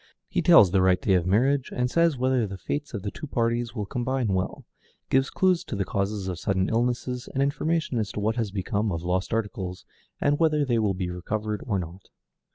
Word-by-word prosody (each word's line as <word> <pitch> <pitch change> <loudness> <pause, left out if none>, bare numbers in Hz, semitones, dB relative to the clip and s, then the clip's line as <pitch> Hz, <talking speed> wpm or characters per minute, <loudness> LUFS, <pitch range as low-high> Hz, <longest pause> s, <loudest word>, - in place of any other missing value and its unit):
He - - 0
tells 95 -4 +7
the 95 0 +3
right 95 -1 +4
day 95 - +1
of 90 -1 +2
marriage, 130 +7 +2
and 125 0 0
says 165 +1 +2
whether 130 -2 +1
the 95 0 -7
fates 145 - -4
of 100 - -5
the 100 - -3
two 150 - -8
parties 115 -2 -1
will 105 -3 -2
combine 125 +1 -1
well; 95 -1 -2 0.5
gives 135 0 +3
clues 185 -2 +2
to - - -5
the 100 -1 -1
causes 100 0 -2
of 90 -2 -4
sudden 95 -2 0
illness, 125 +2 -1
and 135 - +1
information 150 -2 0
as 105 -2 -2
to - - -3
what 110 +2 0
has 115 -4 -1
become 100 +2 -1
of 85 -1 -3
lost 90 +1 -1
articles, 95 -5 -3 0.3
and 145 +1 +2
whether 155 -3 +3
they 120 -3 +1
will 105 -3 +1
be 90 -1 -3
recovered 105 +4 -3
or 105 -4 +1
not. 90 +1 -7
110 Hz, 215 wpm, -26 LUFS, 95-130 Hz, 0.5 s, tells